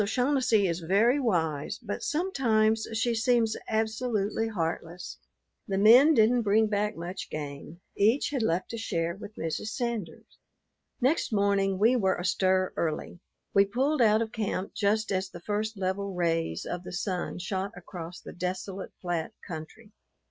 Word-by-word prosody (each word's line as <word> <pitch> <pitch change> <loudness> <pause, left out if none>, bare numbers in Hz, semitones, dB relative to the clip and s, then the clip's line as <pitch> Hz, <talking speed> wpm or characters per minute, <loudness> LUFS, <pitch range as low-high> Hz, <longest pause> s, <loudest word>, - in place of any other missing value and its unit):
Mrs. - - +1
O'Shaughnessy 245 -3 +2
is 170 0 -1
very 205 - +3
wise, 170 - 0
but 220 -4 -5
sometimes 225 -10 +1
she 225 +2 +1
seems 225 -1 +2
absolutely 220 -1 0
heartless. 170 -3 -4 0.5
The 195 - -1
men 245 +10 +7
didn't 235 +2 +4
bring 220 +1 +3
back 210 0 -1
much 175 +3 -6
game; 150 +3 -7
each 225 +9 +2
had 270 -4 -1
left 185 0 -1
a 230 - -4
share 170 -6 -1
with 205 +1 -10
Mrs. 165 +5 -3
Sanders. 230 -5 -4 0.6
Next 265 +4 +1
morning 200 -2 +2
we 225 +6 +4
were 190 -6 +2
astir 185 +1 +1
early. 160 +1 -3 0.3
We 200 - +6
pulled 265 +8 0
out 220 0 +5
of 220 - -7
camp 200 -3 -3
just 215 +1 +1
as 190 0 -1
the 175 - -10
first 210 +3 -2
level 190 +1 -2
rays 165 - 0
of 175 0 -4
the - - -8
sun 180 -1 -3
shot 190 +2 -3
across 175 -1 -8
the - - -9
desolate, 185 +2 -4
flat 175 -3 -2
country. 180 +6 -8
200 Hz, 155 wpm, -28 LUFS, 180-225 Hz, 0.6 s, men